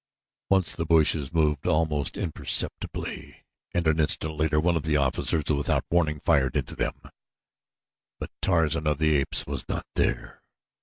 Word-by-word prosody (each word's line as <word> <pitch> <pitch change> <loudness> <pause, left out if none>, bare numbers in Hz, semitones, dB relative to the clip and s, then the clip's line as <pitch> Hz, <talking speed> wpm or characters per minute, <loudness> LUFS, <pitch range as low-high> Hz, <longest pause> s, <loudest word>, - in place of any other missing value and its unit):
Once 95 -3 +2
the 85 - -2
bushes 80 -3 +3
moved 75 -4 0
almost 75 -2 0
imperceptibly 90 -7 -2 0.3
and 85 -1 -1
an 80 0 +2
instant 80 0 +1
later 75 0 +1
one 85 +2 +1
of 80 - 0
the 75 0 0
officers, 70 +3 +1
without 70 -1 0
warning, 80 -3 +1
fired 70 -4 +1
into 70 - -4
them; - - -3 1.2
but - - -6
Tarzan 80 -3 +1
of 75 -1 +1
the 80 0 +2
Apes 70 - -1
was - - -5
not - - -2
there. - - -2
80 Hz, 150 wpm, -26 LUFS, 75-80 Hz, 1.2 s, bushes